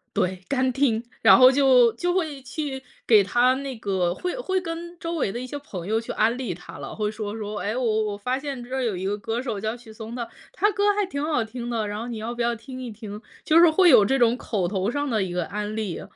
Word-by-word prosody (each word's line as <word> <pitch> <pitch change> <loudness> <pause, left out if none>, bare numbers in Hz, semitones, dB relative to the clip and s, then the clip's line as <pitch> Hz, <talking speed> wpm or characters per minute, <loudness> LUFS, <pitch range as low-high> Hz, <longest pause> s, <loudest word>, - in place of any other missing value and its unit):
对， 185 0 0
干 260 -2 +1
听， 240 -5 +2 0.2
然 - - +8
后 255 0 +8
就 255 -4 +5
就 355 +8 -1
会 310 -7 -2
去 265 0 -5 0.2
给 215 -4 +6
他 245 +6 +3
那 270 -3 -5
个 185 -4 0
会 360 - -4
会 380 -6 -1
跟 340 0 -6
周 335 0 -3
围 255 -10 0
的 240 - -5
一 255 - -5
些 290 +3 -6
朋 185 -11 -8
友 220 +1 +1
去 - - -6
安 225 +3 +2
利 245 -9 -3
他 175 - -11
了， - - -7
会 210 -1 -1
说 215 0 -5
说： 210 -1 -5
“哎， 210 +6 -2
我 220 -3 +1
我 205 -1 -3
发 250 +5 -1
现 275 -3 -5
这 255 +2 -6
儿 265 - -1
有 210 -6 -1
一 190 - -4
个 205 +1 0
歌 230 +2 -3
手 230 -6 -3
叫 220 +3 -3
许 225 -2 -14
嵩 225 +2 -8
的， 235 -2 -4 0.2
他 415 - +2
歌 405 +1 -1
儿 410 - +3
还 415 -1 +1
挺 285 -6 -4
好 300 -7 +1
听 240 +2 -6
的， 225 -3 -1
然 205 +1 -4
后 235 - -5
你 235 -2 -5
要 225 +2 -4
不 240 - -4
要 235 0 +1
听 255 +3 -9
一 245 - -5
听？ 210 0 -8 0.2
“就 325 +1 +5
是 340 -1 +8
会 355 +2 +5
有 210 - +8
这 270 +7 +2
种 240 -1 +4
口 195 -7 -2
头 195 +2 -1
上 285 +3 -2
的 220 -4 +1
一 185 -2 -2
个 175 -2 -1
安 210 +1 -4
利。 210 -6 -3
235 Hz, 290 characters per minute, -24 LUFS, 210-270 Hz, 0.2 s, 然